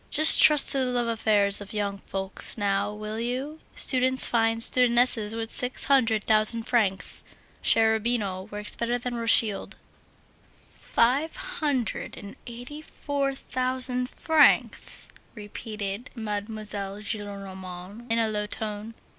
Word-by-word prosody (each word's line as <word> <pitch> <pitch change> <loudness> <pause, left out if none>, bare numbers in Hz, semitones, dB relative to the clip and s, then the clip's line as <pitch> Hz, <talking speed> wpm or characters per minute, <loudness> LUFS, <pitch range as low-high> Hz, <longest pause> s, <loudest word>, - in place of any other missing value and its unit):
Just 310 +2 +7
trust 300 -2 +7
to 275 - +2
the 260 - +1
love 245 -1 -1
affairs 210 -3 +2
of 205 +1 -10
young 200 -1 -3
folks 195 +3 -1
now, 200 0 0
will 215 +1 -6
you! 260 +6 -4 0.2
Students 260 0 +3
find 225 -1 +1
studentesses 240 -3 +2
with 225 0 -4
six 250 +1 +2
hundred 230 -6 +2
thousand 220 +1 +1
francs. 220 -6 0 0.4
Cherubino 220 -3 +1
works 210 0 -6
better 235 +1 -1
than 245 0 -5
Rothschild." 230 -3 +2 1.0
"Five 270 +7 +1
hundred 290 - -3
and 200 0 -10
eighty 245 +6 -8
four 280 -3 -3
thousand 255 -1 -2
francs!" 315 -2 +2 0.3
repeated 210 0 -6
Mademoiselle 210 -2 -5
Gillenormand, 200 0 -7
in 230 - +2
a 225 -1 +2
low 210 -1 -3
tone. 215 +1 -5
225 Hz, 120 wpm, -26 LUFS, 205-250 Hz, 1.0 s, Just